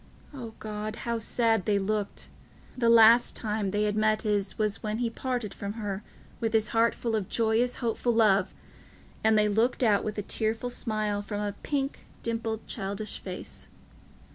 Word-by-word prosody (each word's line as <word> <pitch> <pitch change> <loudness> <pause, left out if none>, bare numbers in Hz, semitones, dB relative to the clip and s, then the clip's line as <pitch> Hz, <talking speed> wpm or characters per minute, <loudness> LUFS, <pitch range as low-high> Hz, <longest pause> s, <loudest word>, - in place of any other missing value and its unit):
O 235 -5 -8
God, 215 0 -5
how 235 -1 0
sad 225 -3 +1
they 205 -1 +2
looked! 205 +1 -2 0.5
The 235 -2 +2
last 230 +1 +7
time 210 -2 -1
they 205 +2 0
had 210 -1 0
met 215 0 +2
his 205 -2 0
was 215 -2 0
when 215 0 -2
he 235 -1 -1
parted 245 -4 -3
from 200 0 -5
her 205 -3 -4 0.4
with 225 -1 -1
his 220 -1 +3
heart 230 +1 +3
full 230 -2 -2
of 205 -4 -2
joyous 230 +2 +1
hopeful 240 0 0
love, 210 -3 +4 0.7
and 220 0 +4
they 210 0 +4
looked 225 +5 +2
out 210 -4 +4
with 215 0 -4
a 205 - -2
tearful 225 +4 -1
smile 215 -3 -1
from 205 0 -4
a 205 -1 -2
pink, 275 -1 -2 0.2
dimpled, 225 -1 -2
childish 200 +2 -4
face. 185 -1 -7
215 Hz, 170 wpm, -28 LUFS, 210-230 Hz, 0.7 s, last